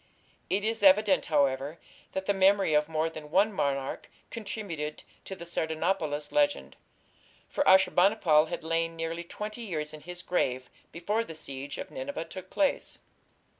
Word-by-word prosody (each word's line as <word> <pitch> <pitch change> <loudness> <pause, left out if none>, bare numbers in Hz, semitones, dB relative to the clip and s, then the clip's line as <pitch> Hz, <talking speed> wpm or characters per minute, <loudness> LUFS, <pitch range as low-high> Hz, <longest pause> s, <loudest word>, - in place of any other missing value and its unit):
It 195 +2 +1
is 225 0 0
evident, 200 0 +5
however, 140 0 +1 0.4
that 190 0 -3
the 200 - +2
memory 195 -3 +4
of 150 +1 +3
more 160 0 0
than 155 -2 -8
one 200 +6 +3
monarch 140 -5 -2 0.2
contributed 200 -9 -5 0.2
to 190 - -6
the 170 -2 -9
Sardanapalus 160 -2 -1
legend, 290 -1 +1 0.7
for 290 - 0
Ashur 190 0 +6
bani 195 +4 +4
pal 155 -6 +4
had 175 0 -5
lain 165 +1 0
nearly 165 +1 -3
twenty 210 +6 -6
years 155 -9 -4
in 155 - -9
his 180 +2 -8
grave 130 -7 -1 0.2
before 205 +7 -1
the 165 -8 -9
siege 140 -2 -7
of - - -7
Nineveh 265 -9 -5
took 185 0 -9
place. 290 -2 0
170 Hz, 160 wpm, -29 LUFS, 155-200 Hz, 0.7 s, Ashur